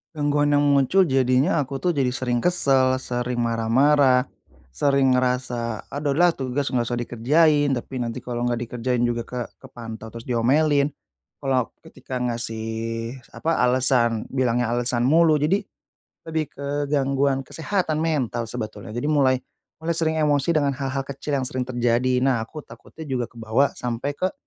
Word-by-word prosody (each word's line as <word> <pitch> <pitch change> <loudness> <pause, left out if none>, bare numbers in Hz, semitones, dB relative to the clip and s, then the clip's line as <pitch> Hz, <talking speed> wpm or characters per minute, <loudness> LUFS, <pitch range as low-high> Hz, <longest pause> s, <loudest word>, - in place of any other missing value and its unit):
Gangguan 145 0 +2
yang 145 - +3
muncul, 140 +6 +4
jadinya 135 +2 +2
aku 135 -1 -4
tuh 180 - +3
jadi 140 -5 0
sering 125 -2 -1
kesel, 135 -5 +2
sering 125 -1 -2
marah-marah, 125 +4 +3 0.5
sering 135 - +2
ngerasa, 125 -3 -1
"Ah, 145 - -3
udah 145 -2 0
lah, 175 +3 +5
tugas 135 -1 -3
nggak 120 -3 +1
usah 120 - -1
dikerjain", 145 +6 +2
tapi 130 +1 -5
nanti 120 0 -4
kalau 120 -1 -4
nggak 120 -1 -1
dikerjain 120 +1 -1
juga 120 -1 -1
ke 125 - -5 0.2
kepantau, 115 -4 -9
terus 115 +1 -9
diomelin. 140 +5 +2 0.6
Kalau 130 -3 0
ketika 130 -1 -7
ngasih, 115 -2 -3 0.7
apa, 165 0 -1
alesan, 125 -3 +3
bilangnya 120 -2 +1
alesan 120 0 0
mulu. 160 +4 +5
Jadi 155 +8 +1 0.6
lebih 160 -1 -1
ke 140 - -6 0.2
gangguan 135 -1 +1
kesehatan 160 +1 -2
mental 130 -8 -1
sebetulnya. 110 -4 -6
Jadi 120 - -2
mulai 140 -4 +3 0.4
mulai 160 +1 -2
sering 160 -1 +1
emosi 150 +1 +2
dengan 145 -2 +2
hal-hal 135 0 -3
kecil 140 +1 -3
yang 135 - -1
sering 130 0 -3
terjadi. 120 +1 +1
Nah, 130 -4 +2
aku 145 +7 -8
takutnya 160 - -12
juga 130 -5 -2
kebawa 115 +4 0
sampai 125 +4 -3
ke 185 +4 -1
130 Hz, 155 wpm, -23 LUFS, 120-145 Hz, 0.7 s, lah